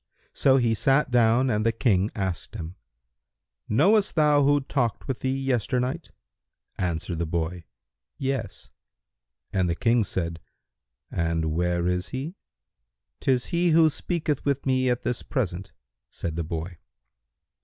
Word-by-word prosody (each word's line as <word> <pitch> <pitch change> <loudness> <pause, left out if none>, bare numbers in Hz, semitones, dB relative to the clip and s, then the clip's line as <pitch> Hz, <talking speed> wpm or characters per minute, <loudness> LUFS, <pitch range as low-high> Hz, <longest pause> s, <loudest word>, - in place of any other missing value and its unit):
So 135 -1 +4
he 120 -3 +2
sat 135 +4 +2
down 120 +2 +4
and 105 -1 +1
the 115 - +3
King 105 -4 +2
asked 95 +1 -3
him, 85 -4 -6 1.0
"Knowest 195 - +3
thou 150 -2 +4
who 145 +1 +4
talked 130 -4 -2
with 130 -3 -2
thee 130 +1 -1
yesternight?" 130 +3 -1 0.7
Answered 85 -1 -2
the 85 - -1
boy, 85 +1 -3 0.5
"Yes," 130 -6 -4 0.8
and 95 -2 +1
the 85 - 0
King 115 +4 +2
said, 85 -4 -3 0.7
"And 80 -2 0
where 85 +1 0
is 90 0 -1
he?" 135 +6 -4 0.9
"'Tis 130 -2 +1
he 175 +1 +3
who 160 -1 +5
speaketh 155 -3 -2
with 140 -1 -1
me 130 -1 +2
at 125 0 -1
this 120 - -1
present," 95 -7 -3 0.4
said 85 -2 -5
the 85 - -2
boy. 85 +2 -5
115 Hz, 135 wpm, -26 LUFS, 90-135 Hz, 1.0 s, who